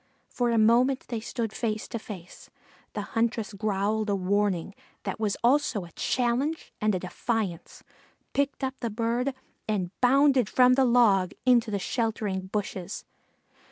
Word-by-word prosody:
For 245 -1 0
a 230 - +2
moment 240 +5 +4
they 235 -2 -2
stood 225 -1 -4
face 215 -2 -2
to 230 - -4
face. 185 -5 -10 0.4
The - - -3
huntress 225 -2 0
growled 210 +1 0
a 200 - +2
warning 195 -1 0 0.3
that 195 0 -4
was 210 -2 0
also 245 -6 +2
a 170 - -14
challenge 255 - -1
and 215 -2 +2
a - - -1
defiance, 185 -1 -3 0.5
picked 280 0 0
up 265 0 0
the 235 - -2
bird 235 +4 -1 0.3
and 190 -5 -1
bounded 265 -2 +4
from 250 0 +5
the 265 +1 +4
log 220 -7 +4
into 240 -3 +4
the 205 - -1
sheltering 205 -2 -2
bushes. 195 -1 -4
225 Hz, 150 wpm, -27 LUFS, 200-245 Hz, 0.5 s, from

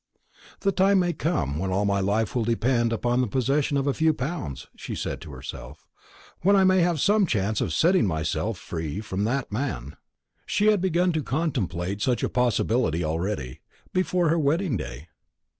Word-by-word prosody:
"The 195 - +2
time 195 +1 +3
may 175 -2 +2
come 80 - -1
when 95 +2 -2
all 95 +2 +1
my 100 -1 +1
life 100 +2 0
will 120 - 0
depend 115 +1 +1
upon 120 +2 +1
the 125 - 0
possession 135 +5 +1
of 135 - 0
a 140 - +1
few 160 +1 +2
pounds," 130 - -4
she - - -6
said - - -4
to 80 - -9
herself; 65 -1 -9 0.5
"when 200 +3 +4
I 195 - +5
may 185 0 +4
have 170 -2 +2
some 205 +3 +3
chance 105 -3 0
of - - -1
setting 175 - +3
myself 80 -3 -1
free 80 +2 -5
from 100 -2 -2
that 130 +2 -1
man." 105 - -3 0.5
She 205 - +1
had 205 -4 +1
begun 180 -1 +2
to 160 -2 -1
contemplate 100 - -2
such 125 +1 +1
a - - +1
possibility 120 -7 +1
already, 80 -4 -3 0.3
before 180 -2 +1
her 165 +1 +2
wedding 155 +1 +1
day. 75 - -6
125 Hz, 180 wpm, -25 LUFS, -, 0.5 s, I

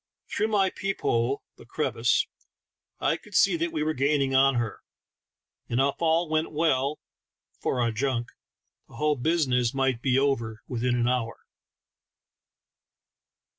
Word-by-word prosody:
Through 215 - 0
my 200 -3 +2
peep 195 0 -4
hole 120 +4 0
— - - -58
the - - -13
crevice - - +1 0.4
— - - -57
I - - +1
could - - -14
see - - +5
that 335 +1 -1
we 150 - -1
were 155 +1 0
gaining 140 -1 +1
on 135 0 +5
her, 120 -3 -2 0.9
and 120 - 0
if 135 +1 +3
all 165 +1 +2
went 155 +1 0
well 150 -2 +1 0.6
(for 130 - -1
our 120 -1 +1
junk) 120 0 -1 0.6
the - - -16
whole 150 0 +1
business 130 -4 +1
might 135 -3 +1
be 130 -1 +2
over 120 -6 0
within 125 0 0
an 120 -1 +1
hour. 120 -2 -2
135 Hz, 150 wpm, -27 LUFS, 120-155 Hz, 0.9 s, see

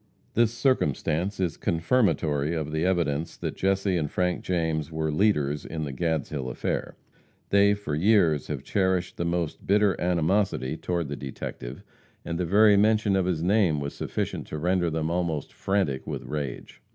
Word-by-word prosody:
This 115 -1 +3
circumstance 100 - 0
is 90 -4 -1
confirmatory 85 - +1
of 75 -2 -3
the 80 +1 -1
evidence 85 -4 0
that - - -4
Jesse 95 -1 +1
and 75 -3 -1
Frank 90 +2 -1
James 80 -3 -1
were 80 -1 -1
leaders 75 -5 +1
in 80 -1 -4
the 70 -2 -4
Gadshill 75 -3 -2
affair. - - -3 0.6
They, 100 +1 +5
for 100 -7 -5
years, 85 -3 +3
have - - -4
cherished 95 -2 0
the 85 - -1
most 85 -2 -2
bitter 100 -1 +4
animosity 85 -5 +1
toward 85 -1 -2
the 70 - -4
detective, 65 -2 -7 0.4
and 85 0 -3
the 90 - 0
very 105 +3 +5
mention 105 -1 +3
of 95 -2 +1
his 85 -3 -1
name 90 -5 +3
was 70 0 -4
sufficient - - -3
to 75 - -5
render 90 +2 +1
them 80 0 -1
almost 85 -4 -2
frantic 95 -10 -1
with - - -4
rage. 70 -5 -5
85 Hz, 165 wpm, -26 LUFS, 75-95 Hz, 0.6 s, They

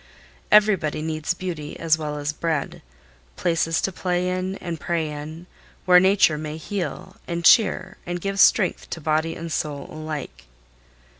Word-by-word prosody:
Everybody 195 -8 +4
needs 155 +1 -2
beauty 165 -5 -6
as 165 -1 +3
well 150 -2 -4
as 145 +1 -2
bread, 160 -2 -2 0.5
places 165 - 0
to 195 - -1
play 180 0 -1
in 185 +1 -2
and 170 -4 -6
pray 165 -1 -1
in, 155 +3 -8 0.4
where 180 -1 +7
Nature 190 -5 +4
may 155 0 -5
heal 170 -1 -5
and 170 -1 -3
cheer 190 -3 +4
and 175 0 -4
give 195 +2 -3
strength 190 -1 +4
to - - -5
body 160 +1 0
and 165 0 -6
soul 145 -2 -3
alike. 150 - -6
165 Hz, 150 wpm, -23 LUFS, 155-180 Hz, 0.5 s, where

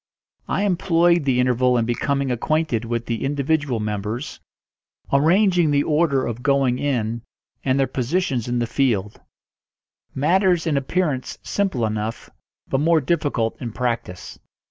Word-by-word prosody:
I 200 - 0
employed 175 -4 +2
the 130 -2 +2
interval 125 0 +2
in 115 - +1
becoming 135 +3 -1
acquainted 125 -1 0
with 115 0 -3
the 115 -1 -3
individual 140 -2 0
members, 105 +5 -4 0.7
arranging 175 +3 +4
the 145 0 +2
order 150 -4 +1
of 120 0 -4
going 135 -2 +2
in, 115 -5 -1 0.4
and 135 0 +1
their 135 - +3
positions 130 0 -1
in 120 0 -1
the 120 - +1
field; 115 -5 -1 0.9
matters 175 +4 +2
in 160 -3 +1
appearance 140 -1 -1
simple 190 - -1
enough, 110 +1 -4 0.4
but 135 - 0
more 165 +2 +3
difficult 140 -7 -1
in 120 -3 -5
practice. 115 -7 -4
135 Hz, 135 wpm, -22 LUFS, 120-155 Hz, 0.9 s, arranging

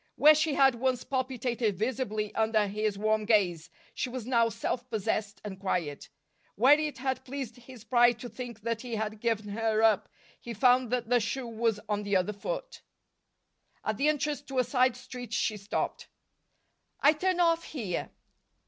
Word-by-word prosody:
Where 305 +1 +8
she 310 -1 +1
had 270 -1 +5
once 250 +1 -1
palpitated 250 -5 -1
visibly 215 -2 -2
under 220 -1 +2
his 210 0 -2
warm 215 +1 +1
gaze, 180 -6 +2 0.2
she - - -2
was 250 -2 -5
now 235 -2 +3
self 245 +3 -3
possessed 215 -1 -2
and 190 -2 -6
quiet. 175 -7 -2 0.5
Where 255 +7 +6
it 305 -1 -2
had 265 0 -2
pleased 260 -3 -6
his 245 -2 -13
pride 240 0 +4
to 245 - -5
think 240 -4 -8
that 230 +1 -2
he 245 -3 -4
had 215 0 -3
given 215 -2 -1
her 220 +1 0
up, 220 -3 +3 0.3
he 235 -1 -7
found 250 +1 +4
that 245 -2 -1
the 245 0 +4
shoe 245 +4 -3
was 230 -2 -1
on 210 -1 -1
the 205 -1 -1
other 185 +3 +1
foot. - - -5 1.0
At - - -1
the 285 - +2
entrance 300 -1 0
to 270 -2 -7
a 255 - +4
side 255 -2 +2
street 245 -2 -8
she 215 0 0
stopped. 200 0 -3 0.9
"I 290 - +6
turn 365 +3 0
off 335 -1 +3
here." 215 - -4
235 Hz, 175 wpm, -29 LUFS, 215-260 Hz, 1.0 s, Where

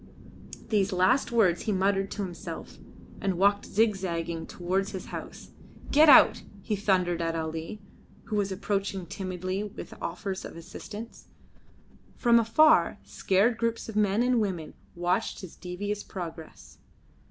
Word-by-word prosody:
These 200 -2 +2
last 190 +9 +2
words 195 -7 +3
he 220 - -1
muttered 195 0 +1
to 205 - -4
himself, 175 -3 -7 0.4
and 195 -3 0
walked 200 +2 +3
zigzaging 175 -6 -1
towards 185 +2 -2
his 190 - -5
house. - - -8 0.4
"Get 305 +2 +7
out!" 275 - +8 0.2
he 215 - -1
thundered 185 -4 +1
at 165 0 -1
Ali, 160 +5 -5 0.4
who 220 - -4
was 200 -1 0
approaching 195 -1 -2
timidly 185 +2 -4
with 210 - -8
offers 190 +2 -4
of - - -8
assistance. 210 +6 -9 0.9
From 235 -1 +4
afar, 310 +8 +4
scared 215 +5 +1
groups 230 0 -1
of 220 - -7
men 210 +2 +2
and 250 -2 +2
women 175 -7 -3 0.2
watched 175 +4 -1
his 185 -4 -10
devious 205 +3 -4
progress. 165 -3 -9
195 Hz, 135 wpm, -28 LUFS, 180-215 Hz, 0.9 s, out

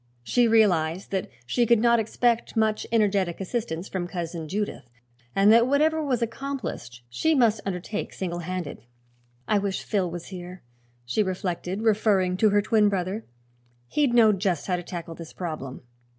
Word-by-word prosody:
She 240 - +3
realized 185 -6 +2
that 190 -2 -2 0.2
she 240 - +1
could 235 - +5
not 235 +1 +4
expect 230 +1 0
much 220 -1 +1
energetic 200 -6 +1
assistance 195 -3 -3
from 180 -2 -3
Cousin 170 -3 -5
Judith 200 - -4 0.5
and 200 +2 +6
that 235 +1 +5
whatever 310 +3 +2
was 250 -5 0
accomplished 230 - -5
she 310 - +1
must 225 -5 +3
undertake 195 +3 -4
single 175 -2 -4
handed. 180 -2 -5 0.7
"I 210 -1 +3
wish 195 -1 -2
Phil 190 -4 0
was 170 0 -7
here," 180 -1 -9 0.4
she 120 - 0
reflected, 185 +1 -3
referring 205 -4 +2
to 215 +2 +4
her 205 0 +3
twin 215 -1 +3
brother; 195 +2 -3 0.6
"he'd 280 -5 +1
know 225 -2 +7
just 190 -5 -1
how 185 - 0
to 175 - -3
tackle 170 -1 -7
this 165 -1 -10
problem." 155 -7 -6
195 Hz, 160 wpm, -25 LUFS, 175-225 Hz, 0.7 s, know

